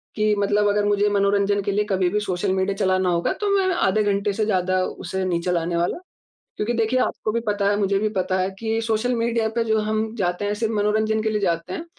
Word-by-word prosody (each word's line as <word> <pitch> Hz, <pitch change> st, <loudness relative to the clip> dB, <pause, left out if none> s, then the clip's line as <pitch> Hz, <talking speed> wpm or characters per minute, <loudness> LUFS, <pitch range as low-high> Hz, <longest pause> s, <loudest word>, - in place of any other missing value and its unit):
कि 215 Hz, -1 st, +2 dB
मतलब 205 Hz, +1 st, +2 dB
अगर 205 Hz, 0 st, +1 dB
मुझे 205 Hz, 0 st, +2 dB
मनोरंजन 200 Hz, 0 st, +2 dB
के 200 Hz, -, -1 dB
लिए 210 Hz, +1 st, +1 dB
कभी 185 Hz, -2 st, +1 dB
भी 210 Hz, -, 0 dB
सोशल 190 Hz, -1 st, -2 dB
मीडिया 190 Hz, +1 st, 0 dB
चलाना 185 Hz, -1 st, +1 dB
होगा, 170 Hz, -1 st, 0 dB
तो 415 Hz, -, -3 dB
मैं 385 Hz, -, +2 dB
आधे 215 Hz, -, +2 dB
घंटे 200 Hz, 0 st, 0 dB
से 215 Hz, +1 st, 0 dB
ज़्यादा 185 Hz, -2 st, +1 dB
उसे 190 Hz, +2 st, -4 dB
नहीं 170 Hz, -2 st, 0 dB
चलाने 175 Hz, -1 st, -1 dB
वाला। 170 Hz, +1 st, 0 dB, 0.6 s
क्योंकि 215 Hz, +3 st, -1 dB
देखिए, 230 Hz, +2 st, +1 dB
आपको 215 Hz, -, -1 dB
भी 235 Hz, -, 0 dB
पता 205 Hz, -1 st, +1 dB
है, 205 Hz, -, +1 dB
मुझे 200 Hz, -1 st, +1 dB
भी 215 Hz, 0 st, 0 dB
पता 185 Hz, -2 st, -1 dB
है 185 Hz, +1 st, 0 dB
कि 225 Hz, 0 st, -1 dB
सोशल 225 Hz, +2 st, 0 dB
मीडिया 230 Hz, -1 st, 0 dB
पे 230 Hz, -, +3 dB
जो 220 Hz, -1 st, +1 dB
हम 215 Hz, +1 st, -1 dB
जाते 180 Hz, -1 st, -1 dB
हैं, 205 Hz, -, 0 dB
सिर्फ़ 225 Hz, +1 st, -2 dB
मनोरंजन 215 Hz, +1 st, +1 dB
के 220 Hz, -, +1 dB
लिए 215 Hz, -1 st, 0 dB
जाते 170 Hz, -1 st, -1 dB
हैं। 330 Hz, -, -5 dB
205 Hz, 235 wpm, -22 LUFS, 190-220 Hz, 0.6 s, पे